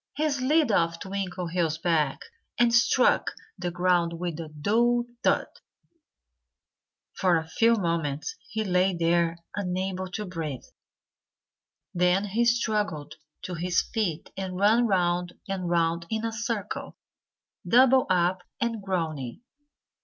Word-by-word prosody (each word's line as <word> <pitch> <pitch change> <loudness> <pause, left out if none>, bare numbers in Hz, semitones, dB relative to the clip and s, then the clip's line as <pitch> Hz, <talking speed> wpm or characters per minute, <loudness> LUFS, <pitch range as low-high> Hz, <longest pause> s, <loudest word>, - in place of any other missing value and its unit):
He 305 +2 +1
slid 275 0 +2
off 165 -3 +2
Twinkleheels' 180 -4 -2
back 160 -5 +1 0.4
and 240 -1 +3
struck 240 +2 +3 0.2
the 175 - -3
ground 175 -1 +1
with 170 -1 -4
a 160 -2 -6
dull 235 +10 +1 0.2
thud. - - +3 1.7
For 180 -3 +2
a 160 0 -4
few 230 +8 +3
moments 165 - -2
he 220 0 -2
lay 185 -1 +2
there, 170 0 +1 0.2
unable 185 -1 -2
to 210 +1 -3
breathe. 160 -8 -5 1.3
Then 180 +3 +2
he 220 +4 +1
struggled 210 -10 0 0.3
to 180 - -5
his 175 +1 +1
feet 195 -9 -2
and 190 -1 -4
ran 220 +5 +4
round 175 -2 +1
and 190 -3 -3
round 170 0 +1
in 220 0 -2
a 225 - -1
circle, 225 -2 -4 0.7
doubled 260 +2 +5
up 180 0 +2 0.2
and 230 -2 -1
groaning. 165 - -3
185 Hz, 125 wpm, -27 LUFS, 170-220 Hz, 1.7 s, doubled